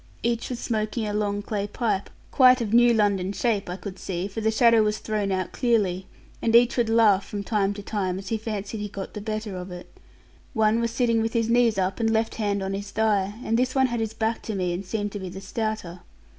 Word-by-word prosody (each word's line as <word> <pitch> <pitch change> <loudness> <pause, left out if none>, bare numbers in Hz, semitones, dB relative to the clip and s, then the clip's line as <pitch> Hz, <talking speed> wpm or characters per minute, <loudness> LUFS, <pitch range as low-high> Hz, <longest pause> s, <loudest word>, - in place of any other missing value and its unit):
Each 235 0 -1
was 250 - -3
smoking 220 -1 -2
a 210 - -3
long 205 -1 -1
clay 205 -1 -2
pipe, 205 -2 -1 0.2
quite 255 -2 +6
of 225 -2 -2
new 240 0 +6
London 200 -4 +2
shape, 205 -2 0
I 180 - -3
could 190 -1 -8
see, 185 0 -3
for 205 +3 -5
the 220 - +2
shadow 230 0 +5
was 210 0 +1
thrown 210 -2 -2
out 185 -1 -1
clearly; 200 -7 0 0.3
and 230 0 +2
each 240 +2 +5
would 235 -3 +1
laugh 220 -4 +4
from 205 -1 -5
time 200 -2 +1
to 205 - -8
time, 190 -4 -2
as 195 0 -7
he 225 - 0
fancied 210 -1 -4
he 205 - -3
got 195 -1 -7
the 210 - -6
better 215 -1 -4
of 180 +1 -6
it. 180 0 -10 0.6
One 220 0 +3
was 235 0 0
sitting 230 -1 +1
with 225 0 -1
his 230 -1 +1
knees 235 -3 +3
up, 190 +2 -1
and 225 -1 +2
left 225 0 +1
hand 200 -2 0
on 190 0 -3
his 200 +1 -5
thigh; 205 -2 +1
and 225 +1 +1
this 255 +1 0
one 265 -1 +4
had 240 -2 -1
his 225 -1 -3
back 225 +1 -1
to 220 - -4
me, 180 -2 -1
and 180 +3 -4
seemed 205 +1 -3
to 205 - -5
be 190 -1 -6
the 190 +2 -8
stouter. 195 -3 -4
215 Hz, 240 wpm, -25 LUFS, 195-230 Hz, 0.6 s, quite